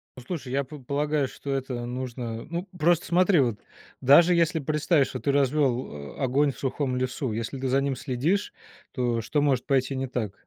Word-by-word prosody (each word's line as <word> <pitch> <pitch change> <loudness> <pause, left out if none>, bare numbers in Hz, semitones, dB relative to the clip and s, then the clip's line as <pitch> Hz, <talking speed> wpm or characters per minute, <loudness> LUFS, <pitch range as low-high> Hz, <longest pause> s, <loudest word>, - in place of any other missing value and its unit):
Ну 125 - -11
слушай, 140 -5 -5
я 140 +2 +1
п 145 +3 -10
полагаю, 145 +2 0
что 140 - -7
это 130 -3 -3
нужно 120 -2 -5
Ну, 170 +3 -4
просто 170 +2 +3
смотри, 180 0 +4
вот 120 -6 +1 0.4
даже 165 +7 +7
если 170 -1 +2
представишь, 150 0 +2
что - - -5
ты 140 - 0
развел, 130 - 0
а, - - -3
огонь 140 +3 +2
в 125 - -15
сухом 135 -1 -1
лесу, 130 -1 -2
если 115 +5 -4
ты 135 - -2
за 135 +2 +2
ним 140 -1 -1
следишь, 145 +10 -1 0.4
то 120 -3 0
что 145 +7 0
может 135 -4 +1
пойти 135 -1 +1
не 135 0 -2
так? 115 -6 -3
135 Hz, 195 wpm, -26 LUFS, 125-150 Hz, 0.4 s, даже